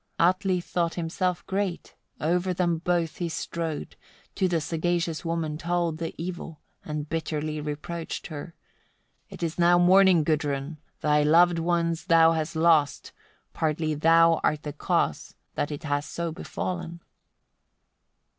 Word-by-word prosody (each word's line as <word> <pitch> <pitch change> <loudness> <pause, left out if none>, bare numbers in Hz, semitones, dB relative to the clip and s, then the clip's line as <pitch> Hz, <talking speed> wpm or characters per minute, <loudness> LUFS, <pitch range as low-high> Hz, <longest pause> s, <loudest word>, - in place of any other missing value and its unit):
64. 170 - +5
Atli 185 -1 0
thought 170 -1 -1
himself 175 +1 -2
great: 195 -2 -3 0.3
over 180 +3 0
them 170 -2 +1
both 170 -1 -1
he 175 -2 -2
strode, 160 - -4 0.4
to 190 - +1
the 175 -2 +1
sagacious 165 +1 -1
woman 165 -2 -2
told 170 -2 -1
the 165 -1 -4
evil, 170 -2 -6 0.2
and 150 -1 -4
bitterly 155 -1 -3
reproached 150 +3 -5
her. 165 +2 -8 0.7
"It - - -8
is 165 +1 -3
now 175 0 +5
morning, 180 -1 +6
Gudrun! 150 -1 -1 0.2
thy 150 0 +3
loved 170 +3 +5
ones 170 -1 0
thou 165 -1 +6
hast 160 0 -2
lost; 160 -4 +2 0.4
partly 155 0 -1
thou 165 +2 +4
art 150 -1 +1
the 150 - -5
cause - - -1 0.2
that 145 - -2
it 150 +3 -6
has 145 -1 -1
so 170 -1 -3
befallen." 170 0 -5
165 Hz, 135 wpm, -26 LUFS, 155-175 Hz, 0.7 s, morning